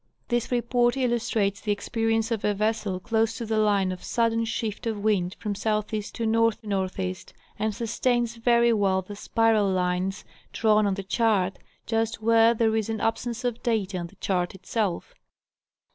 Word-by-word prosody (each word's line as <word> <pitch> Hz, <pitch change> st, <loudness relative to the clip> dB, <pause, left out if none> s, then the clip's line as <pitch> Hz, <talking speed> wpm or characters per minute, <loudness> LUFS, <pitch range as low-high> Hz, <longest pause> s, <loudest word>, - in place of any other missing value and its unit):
This 240 Hz, -1 st, 0 dB
report 240 Hz, +1 st, +2 dB
illus 240 Hz, -3 st, 0 dB
trates 200 Hz, -2 st, 0 dB
the 210 Hz, -, -1 dB
experience 225 Hz, +2 st, 0 dB
of 225 Hz, -3 st, -1 dB
a 210 Hz, -1 st, +1 dB
vessel 210 Hz, -2 st, -1 dB
close 225 Hz, +2 st, 0 dB
to 235 Hz, -, -4 dB
the 220 Hz, 0 st, 0 dB
line 200 Hz, -3 st, +2 dB
of 185 Hz, -, -7 dB
sudden 230 Hz, -1 st, +1 dB
shift 225 Hz, -1 st, -3 dB
of 220 Hz, -2 st, -1 dB
wind 190 Hz, -4 st, +1 dB
from 210 Hz, -2 st, -3 dB
SE. 215 Hz, +1 st, 0 dB, 0.3 s
to 235 Hz, -, -5 dB
N 220 Hz, -4 st, +1 dB
NE., 185 Hz, -1 st, -2 dB, 0.4 s
and 215 Hz, 0 st, -1 dB
sustains 235 Hz, 0 st, 0 dB
very 235 Hz, 0 st, +4 dB
well 195 Hz, -3 st, +1 dB
the 205 Hz, +3 st, -9 dB
spiral 220 Hz, -1 st, +2 dB
lines 185 Hz, +1 st, -1 dB, 0.3 s
drawn 215 Hz, -2 st, +3 dB
on 195 Hz, -, 0 dB
the 195 Hz, -, -5 dB
chart, 195 Hz, -3 st, +1 dB, 0.3 s
just 225 Hz, 0 st, -1 dB
where 230 Hz, +1 st, +4 dB
there 220 Hz, -1 st, +2 dB
is 220 Hz, -1 st, -1 dB
an 220 Hz, -1 st, -2 dB
absence 230 Hz, +3 st, -2 dB
of 245 Hz, -2 st, -2 dB
data 210 Hz, -5 st, -1 dB
on 170 Hz, -, -4 dB
the 200 Hz, -, -19 dB
chart 185 Hz, -2 st, -1 dB
itself. 195 Hz, -, -2 dB
220 Hz, 175 wpm, -26 LUFS, 200-230 Hz, 0.4 s, very